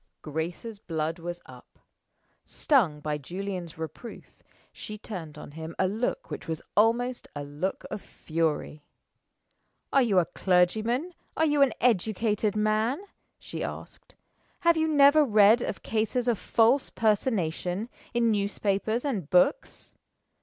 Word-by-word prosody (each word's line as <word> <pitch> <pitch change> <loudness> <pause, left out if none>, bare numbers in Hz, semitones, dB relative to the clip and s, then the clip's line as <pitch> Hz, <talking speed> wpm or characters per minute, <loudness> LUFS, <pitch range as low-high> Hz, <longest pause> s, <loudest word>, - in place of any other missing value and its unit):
Grace's 170 +8 -4
blood 160 -2 -3
was 175 +1 -6
up. - - -15 0.7
Stung 190 - +1
by 150 0 -2
Julian's 180 +2 -6
reproof, 160 +9 -9 0.3
she 215 - -8
turned 180 -8 -8
on - - -10
him 160 +2 -8
a 190 - +2
look 220 +6 -2
which - - -6
was 160 -1 -4
almost 235 +4 +2
a 145 - -4
look 145 +7 -4
of 205 - -4
fury. 155 -2 -3 1.1
"Are 275 - +6
you 220 -6 +2
a 180 - +5
clergyman? 220 - +1 0.2
Are 320 - +3
you 295 -2 +2
an 270 -5 +5
educated 215 -1 +1
man?" 215 +5 +1 0.4
she - - -6
asked. - - -8 0.5
"Have 335 -1 +4
you 320 0 +1
never 295 0 +6
read 215 -1 +5
of - - -4
cases 225 +3 -1
of 235 -4 +1
false 235 +5 +3
personation, 205 -3 0 0.2
in 235 -2 +2
newspapers 205 +3 -1
and 200 - -2
books? 180 - +1
210 Hz, 130 wpm, -27 LUFS, 170-235 Hz, 1.1 s, Are